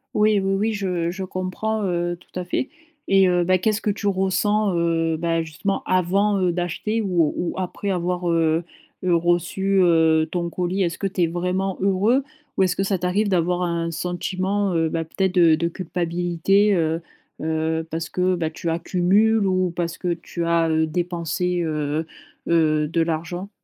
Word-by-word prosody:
Oui, 210 Hz, -1 st, +4 dB
oui, 195 Hz, 0 st, 0 dB
oui, 215 Hz, +3 st, 0 dB
je 180 Hz, -4 st, -1 dB
je 190 Hz, +1 st, -5 dB
comprends, 185 Hz, +4 st, -3 dB
heu, 175 Hz, -2 st, -1 dB
tout 180 Hz, -, -9 dB
à 180 Hz, -, -4 dB
fait. 220 Hz, +8 st, -2 dB, 0.4 s
Et 195 Hz, -1 st, +5 dB
heu 180 Hz, -1 st, +2 dB
bah, 185 Hz, +2 st, +3 dB
qu'est-ce 215 Hz, +4 st, 0 dB
que -, -, -1 dB
tu 205 Hz, 0 st, -2 dB
ressens, 200 Hz, +2 st, +1 dB
heu 165 Hz, -1 st, +1 dB
bah, 165 Hz, 0 st, 0 dB
justement 160 Hz, +5 st, -3 dB
avant, 195 Hz, +3 st, +2 dB
heu, 180 Hz, -2 st, +1 dB
d'acheter 180 Hz, +6 st, -2 dB
ou 175 Hz, -7 st, +1 dB
ou 175 Hz, -, -2 dB
après 185 Hz, +2 st, -3 dB
avoir, 180 Hz, -1 st, -1 dB
heu 165 Hz, 0 st, +2 dB, 0.4 s
heu, 180 Hz, -, +2 dB
reçu, 175 Hz, +3 st, +1 dB
heu, 160 Hz, -2 st, +4 dB
ton 170 Hz, -1 st, -2 dB
colis? 180 Hz, +3 st, -1 dB
Est-ce 170 Hz, -2 st, -2 dB
que -, -, -4 dB
tu 185 Hz, -2 st, -1 dB
es -, -, +3 dB
vraiment 180 Hz, +3 st, -2 dB
heureux, 200 Hz, +7 st, +2 dB, 0.3 s
ou 190 Hz, -, +4 dB
est-ce 180 Hz, -1 st, 0 dB
que 195 Hz, -, +1 dB
ça 195 Hz, 0 st, 0 dB
t'arrive 180 Hz, +4 st, 0 dB
d'avoir 180 Hz, -1 st, +1 dB
un 170 Hz, -1 st, -1 dB
sentiment, 185 Hz, +3 st, -1 dB
heu 165 Hz, -1 st, +2 dB
bah, 165 Hz, +1 st, -2 dB
peut-être 190 Hz, +3 st, -2 dB
de 170 Hz, -3 st, +6 dB
de 170 Hz, +2 st, -1 dB
culpabilité, 175 Hz, +3 st, +1 dB
heu 165 Hz, -1 st, 0 dB, 0.4 s
heu, 160 Hz, +1 st, -1 dB
parce 165 Hz, +1 st, -3 dB
que, 185 Hz, 0 st, 0 dB
bah, 165 Hz, -2 st, -1 dB
tu 165 Hz, +2 st, -5 dB
accumules 190 Hz, +6 st, +2 dB
ou 185 Hz, -1 st, +1 dB
parce 170 Hz, -1 st, -2 dB
que 180 Hz, -2 st, -1 dB
tu 170 Hz, 0 st, -5 dB
as, 165 Hz, -1 st, +2 dB
heu, 160 Hz, 0 st, +2 dB
dépensé, 175 Hz, +1 st, -1 dB
heu 155 Hz, -1 st, -1 dB, 0.4 s
heu, 155 Hz, -2 st, +2 dB
de 165 Hz, +2 st, 0 dB
l'argent? 170 Hz, +4 st, -3 dB
175 Hz, 180 wpm, -22 LUFS, 165-190 Hz, 0.4 s, de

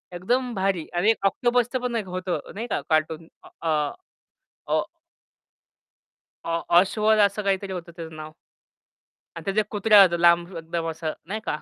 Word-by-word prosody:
एकदम 245 Hz, +7 st, -1 dB
भारी 190 Hz, -4 st, 0 dB
आणि 190 Hz, +5 st, +3 dB
एक 220 Hz, -, -3 dB
ऑक्टोपसचं 245 Hz, +4 st, +1 dB
पण 245 Hz, -2 st, -2 dB
होतं 185 Hz, 0 st, -3 dB, 0.2 s
नाही 230 Hz, +3 st, -4 dB
का, -, -, -1 dB
कार्टून 155 Hz, +1 st, 0 dB, 0.3 s
अ, 165 Hz, -, -2 dB, 1.0 s
अ -, -, +2 dB, 1.6 s
अ, -, -, -7 dB
ऑ 165 Hz, 0 st, 0 dB, 0.2 s
अश्वद 215 Hz, +3 st, +2 dB
असं 205 Hz, +1 st, +3 dB
काहीतरी 195 Hz, 0 st, -1 dB
होतं 170 Hz, -2 st, -7 dB
त्याचं 160 Hz, -2 st, -8 dB
नाव. 155 Hz, 0 st, -8 dB, 1.0 s
आणि 165 Hz, -, -8 dB
त्याचा 195 Hz, +2 st, +1 dB
एक 210 Hz, -, -2 dB
कुत्रा 210 Hz, 0 st, +5 dB
होता, 175 Hz, -2 st, +3 dB
लांब 170 Hz, +1 st, +3 dB
एकदम 165 Hz, 0 st, -4 dB
असा 160 Hz, -1 st, -4 dB
नाही 215 Hz, +4 st, -4 dB
का? 150 Hz, -, -1 dB
185 Hz, 155 wpm, -24 LUFS, 165-215 Hz, 1.6 s, कुत्रा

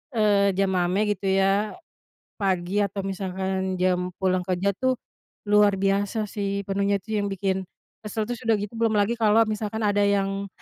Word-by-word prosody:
eee, 205 Hz, -2 st, +3 dB
jam 195 Hz, -1 st, +2 dB
mame 185 Hz, +4 st, +1 dB
gitu 195 Hz, -, -8 dB
ya. 195 Hz, +2 st, +2 dB, 0.7 s
Pagi 190 Hz, 0 st, 0 dB
atau 200 Hz, 0 st, -3 dB
misalkan 190 Hz, 0 st, -2 dB
jam 180 Hz, 0 st, +1 dB
pulang 185 Hz, -1 st, +2 dB
kerja 185 Hz, +2 st, 0 dB
tuh, 260 Hz, 0 st, +1 dB, 0.5 s
luar 205 Hz, -1 st, +5 dB
biasa 200 Hz, +2 st, 0 dB
sih, 200 Hz, -1 st, -2 dB
penuhnya 200 Hz, +1 st, +1 dB
tuh 220 Hz, +4 st, -7 dB
yang 205 Hz, -, -1 dB
bikin 190 Hz, 0 st, -1 dB, 0.4 s
kesel, 215 Hz, +1 st, -2 dB
terus 245 Hz, 0 st, -5 dB
udah 225 Hz, -, +5 dB
gitu, 205 Hz, +2 st, -5 dB
belum 225 Hz, -1 st, +2 dB
lagi 205 Hz, +3 st, +2 dB
kalau 225 Hz, 0 st, +5 dB
misalkan 215 Hz, +1 st, -3 dB
ada 205 Hz, 0 st, +2 dB
yang, 200 Hz, 0 st, 0 dB
200 Hz, 165 wpm, -25 LUFS, 190-210 Hz, 0.7 s, luar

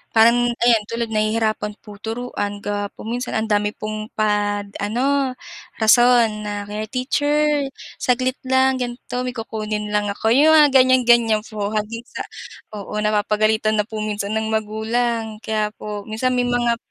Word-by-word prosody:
Parang 235 Hz, +2 st, +5 dB, 0.2 s
ayan 230 Hz, -3 st, +4 dB
tulad 230 Hz, -1 st, -2 dB
nahihirapan 215 Hz, -1 st, 0 dB
po 210 Hz, -2 st, -12 dB
turuan 220 Hz, -3 st, -4 dB
gawa 205 Hz, 0 st, -2 dB
po -, -, -13 dB
minsan 245 Hz, +2 st, -3 dB
ang 220 Hz, 0 st, -1 dB
dami 210 Hz, 0 st, +1 dB
pong 215 Hz, 0 st, -5 dB
pad 205 Hz, -1 st, 0 dB
ano 260 Hz, +5 st, 0 dB, 0.5 s
rason 240 Hz, +1 st, +6 dB, 0.2 s
na 205 Hz, 0 st, -4 dB
kaya, 215 Hz, +1 st, -4 dB
"Teacher, 290 Hz, +3 st, +1 dB, 0.4 s
saglit 255 Hz, +1 st, +1 dB
lang, 260 Hz, 0 st, +3 dB
ganito 245 Hz, 0 st, -4 dB
may 250 Hz, -, -3 dB
kukunin 215 Hz, -2 st, -4 dB
lang 210 Hz, 0 st, +1 dB
ako," 210 Hz, +2 st, -1 dB
yung 305 Hz, +5 st, +6 dB
mga 300 Hz, -2 st, +7 dB
ganiyan-ganiyan 240 Hz, -4 st, +5 dB
po, 210 Hz, -1 st, -4 dB
hanggang 220 Hz, +2 st, -3 dB
sa -, -, -5 dB, 0.5 s
oo, 200 Hz, -, -8 dB
napapagalitan 215 Hz, +1 st, +1 dB
na 210 Hz, -, +1 dB
po 220 Hz, -, -6 dB
minsan 210 Hz, -1 st, -3 dB
ng 220 Hz, 0 st, -2 dB
magulang. 220 Hz, +1 st, -1 dB
Kaya 215 Hz, -1 st, -1 dB
po 210 Hz, -1 st, -6 dB
minsan 225 Hz, +4 st, -1 dB
may 245 Hz, 0 st, +1 dB
mga 240 Hz, -1 st, +1 dB
220 Hz, 155 wpm, -21 LUFS, 210-245 Hz, 0.5 s, mga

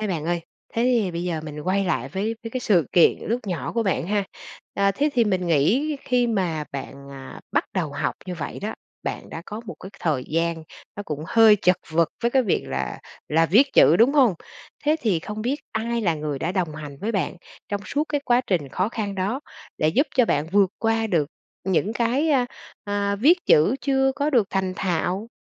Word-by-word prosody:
Thế 215 Hz, -, -1 dB
bạn 165 Hz, -6 st, -2 dB
ơi, 175 Hz, 0 st, 0 dB, 0.3 s
thế 230 Hz, -, +1 dB
thì 240 Hz, -6 st, +2 dB
bây 170 Hz, 0 st, -4 dB
giờ 165 Hz, -3 st, -2 dB
mình 150 Hz, -1 st, -7 dB
quay 190 Hz, +5 st, 0 dB
lại 175 Hz, -4 st, -1 dB
với 210 Hz, +4 st, -2 dB
với 225 Hz, -, -6 dB
cái 255 Hz, -, -3 dB
sự 190 Hz, -, +3 dB
kiện 175 Hz, -, +5 dB
lúc 235 Hz, +3 st, -1 dB
nhỏ 180 Hz, -4 st, -3 dB
của 230 Hz, -, +1 dB
bạn 190 Hz, -5 st, 0 dB
ha. 205 Hz, +1 st, 0 dB, 0.5 s
À, 200 Hz, 0 st, +3 dB
thế 285 Hz, +10 st, 0 dB
thì 240 Hz, -3 st, +3 dB
mình 185 Hz, -4 st, 0 dB
nghĩ 220 Hz, -, +2 dB
khi 250 Hz, -1 st, +2 dB
mà 180 Hz, -9 st, -1 dB
bạn, 140 Hz, 0 st, -7 dB
à, 135 Hz, -1 st, -10 dB
bắt -, -, +2 dB
đầu 165 Hz, -7 st, -1 dB
học 145 Hz, -, -1 dB
như 180 Hz, -, -4 dB
vậy 160 Hz, -4 st, -5 dB
đó, 210 Hz, +2 st, -3 dB, 0.3 s
bạn -, -, -5 dB
đã 165 Hz, -, -6 dB
có 210 Hz, +2 st, -6 dB
một -, -, -6 dB
cái 190 Hz, -, -9 dB
thời 145 Hz, -6 st, 0 dB
gian 165 Hz, +1 st, 0 dB, 0.3 s
nó 205 Hz, -, -4 dB
cũng 155 Hz, -5 st, -5 dB
hơi 225 Hz, 0 st, +6 dB
chật 180 Hz, -2 st, +3 dB
vật 165 Hz, +1 st, +3 dB
với 235 Hz, -, +2 dB
cái 265 Hz, +1 st, +3 dB
việc 205 Hz, -, 0 dB
là 65 Hz, -2 st, -3 dB, 0.3 s
là 165 Hz, +2 st, +3 dB
viết 245 Hz, -, +4 dB
chữ, 160 Hz, -, +6 dB
đúng 235 Hz, +7 st, +5 dB
hông? 260 Hz, -9 st, +4 dB, 0.5 s
Thế 305 Hz, +2 st, +3 dB
thì 205 Hz, -, +1 dB
không 215 Hz, +4 st, -6 dB
biết 255 Hz, +5 st, 0 dB, 0.2 s
ai 230 Hz, +2 st, -1 dB
là 175 Hz, -7 st, +1 dB
người 150 Hz, -2 st, -3 dB
đã 170 Hz, +6 st, -2 dB
đồng 175 Hz, -5 st, -1 dB
hành 150 Hz, -2 st, -8 dB
với 225 Hz, +3 st, -2 dB
bạn 190 Hz, -3 st, -1 dB, 0.3 s
trong 205 Hz, -1 st, -2 dB
suốt 295 Hz, +6 st, -1 dB
cái 290 Hz, -1 st, 0 dB
quá 245 Hz, -2 st, +4 dB
trình 165 Hz, -8 st, 0 dB
khó 185 Hz, +9 st, -1 dB
khăn 210 Hz, -4 st, -4 dB
đó 200 Hz, +8 st, -1 dB, 0.4 s
để 155 Hz, -, +2 dB
giúp 275 Hz, -, +2 dB
cho 255 Hz, -, +5 dB
bạn 150 Hz, -8 st, 0 dB
vượt 200 Hz, -2 st, +4 dB
qua 225 Hz, 0 st, +1 dB
được 165 Hz, -8 st, +1 dB, 0.4 s
những 190 Hz, +3 st, +1 dB
cái, 245 Hz, +7 st, +1 dB
a, 255 Hz, -4 st, +3 dB, 0.4 s
à, 200 Hz, 0 st, -1 dB
viết 315 Hz, -, +5 dB
chữ 155 Hz, +10 st, +5 dB
chưa 270 Hz, 0 st, +2 dB
có 295 Hz, +1 st, 0 dB
được 235 Hz, -7 st, +3 dB
thành 190 Hz, -1 st, -1 dB
thạo? 180 Hz, +4 st, -1 dB
200 Hz, 220 wpm, -24 LUFS, 165-230 Hz, 0.5 s, hơi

